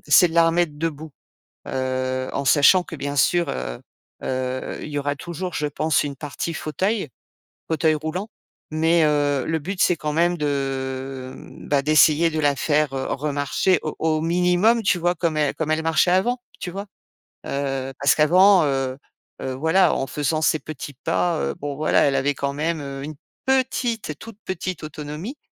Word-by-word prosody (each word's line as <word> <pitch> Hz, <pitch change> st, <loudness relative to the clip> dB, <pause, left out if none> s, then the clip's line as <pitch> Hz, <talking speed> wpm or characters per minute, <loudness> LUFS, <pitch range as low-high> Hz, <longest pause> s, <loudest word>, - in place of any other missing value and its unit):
c'est 180 Hz, -, +7 dB
de 160 Hz, -, -8 dB
la 170 Hz, -1 st, +5 dB
remettre 165 Hz, -1 st, +1 dB
debout. 160 Hz, -1 st, -4 dB, 0.5 s
Heu, 130 Hz, 0 st, -2 dB
en 140 Hz, -, -2 dB
sachant 145 Hz, +7 st, +5 dB
que -, -, -9 dB
bien 145 Hz, -1 st, -4 dB
sûr, 175 Hz, +5 st, +3 dB
heu -, -, -4 dB, 0.4 s
heu, 130 Hz, 0 st, -3 dB
il -, -, -6 dB
y 145 Hz, -1 st, -3 dB
aura 145 Hz, 0 st, -2 dB
toujours, 175 Hz, +4 st, -5 dB
je 150 Hz, -, -1 dB
pense, 150 Hz, +1 st, +1 dB
une 145 Hz, -1 st, -4 dB
partie 145 Hz, +4 st, -5 dB
fauteuil, 190 Hz, +5 st, -1 dB, 0.6 s
fauteuil 160 Hz, 0 st, +2 dB
roulant. 160 Hz, +7 st, -4 dB, 0.4 s
Mais, 160 Hz, +2 st, +3 dB
heu, 145 Hz, -3 st, +1 dB
le 160 Hz, 0 st, 0 dB
but, 180 Hz, +5 st, -2 dB
c'est 180 Hz, -, +3 dB
quand 150 Hz, -1 st, -3 dB
même 175 Hz, +2 st, +2 dB
de, 150 Hz, -, -1 dB
heu, 135 Hz, -2 st, -3 dB, 0.3 s
bah, 140 Hz, -1 st, +2 dB
d'essayer 155 Hz, +2 st, +5 dB
de 155 Hz, 0 st, -2 dB
la 145 Hz, -2 st, +2 dB
faire, 150 Hz, -2 st, +1 dB
heu, 130 Hz, -, -2 dB
remarcher 145 Hz, +5 st, +1 dB
au 155 Hz, -, -4 dB
au 155 Hz, -1 st, +1 dB
minimum, 180 Hz, +7 st, +3 dB
tu 190 Hz, -, +2 dB
vois? 175 Hz, +1 st, +1 dB
Comme 165 Hz, -2 st, -1 dB
elle 150 Hz, -2 st, +1 dB
elle 155 Hz, 0 st, 0 dB
marchait 165 Hz, +2 st, +3 dB
avant, 240 Hz, +7 st, +1 dB, 0.2 s
tu 180 Hz, -, -5 dB
vois? 200 Hz, +3 st, -6 dB, 0.6 s
Heu, 135 Hz, -1 st, -2 dB
parce 140 Hz, 0 st, +4 dB
qu'avant, 180 Hz, +3 st, +5 dB
heu, 135 Hz, -2 st, -1 dB, 0.4 s
voilà, 160 Hz, +8 st, +2 dB
en 135 Hz, -, -2 dB
faisant 150 Hz, +3 st, -1 dB
ses 155 Hz, -1 st, +2 dB
petits 150 Hz, -2 st, -8 dB
pas, 170 Hz, -3 st, +1 dB
heu, -, -, -1 dB
bon 145 Hz, -1 st, -4 dB
voilà, 155 Hz, -, +3 dB
elle 140 Hz, -1 st, +2 dB
avait 145 Hz, +2 st, +1 dB
quand 140 Hz, +1 st, -2 dB
même, 160 Hz, +2 st, -2 dB
heu, 135 Hz, -1 st, -6 dB
une 155 Hz, +2 st, -6 dB, 0.3 s
petite, 245 Hz, -, 0 dB
toute 225 Hz, -3 st, -11 dB
petite 185 Hz, -1 st, -4 dB
autonomie, 155 Hz, -, -6 dB
155 Hz, 175 wpm, -23 LUFS, 140-175 Hz, 0.6 s, c'est